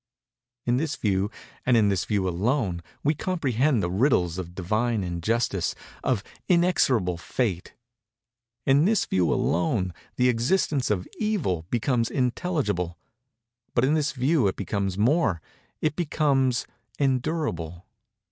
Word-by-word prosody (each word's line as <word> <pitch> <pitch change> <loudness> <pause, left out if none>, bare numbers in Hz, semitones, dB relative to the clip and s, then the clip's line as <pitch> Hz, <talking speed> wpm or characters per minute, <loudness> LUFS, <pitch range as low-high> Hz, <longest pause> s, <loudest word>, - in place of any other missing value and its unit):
In 120 0 +2
this 150 +1 -1
view, 100 -1 0 0.3
and 125 -2 +4
in 105 -2 +4
this 95 -3 0
view 100 -3 0
alone, 95 0 0 0.2
we 150 - +3
comprehend 140 - +1
the 90 - -1
riddles 95 - +2
of 90 -1 -7
Divine 110 +4 0
Injustice—of 105 +4 -1 0.3
Inexorable 135 - +3
Fate. 95 -3 -2 0.9
In 140 +3 +4
this 220 +2 +3
view 90 -3 +1
alone 90 +2 +1 0.2
the 125 - +3
existence 130 +3 +1
of 95 -4 -1
Evil 145 - -1
becomes 120 0 +1
intelligible; 125 - -1 0.8
but 120 - +4
in 145 - +2
this 150 -2 +1
view 135 -2 +2
it 95 - -1
becomes 100 -1 -2
more—it 135 - 0
becomes 140 -6 +1 0.3
endurable. 130 - -1
120 Hz, 120 wpm, -26 LUFS, 95-145 Hz, 0.9 s, and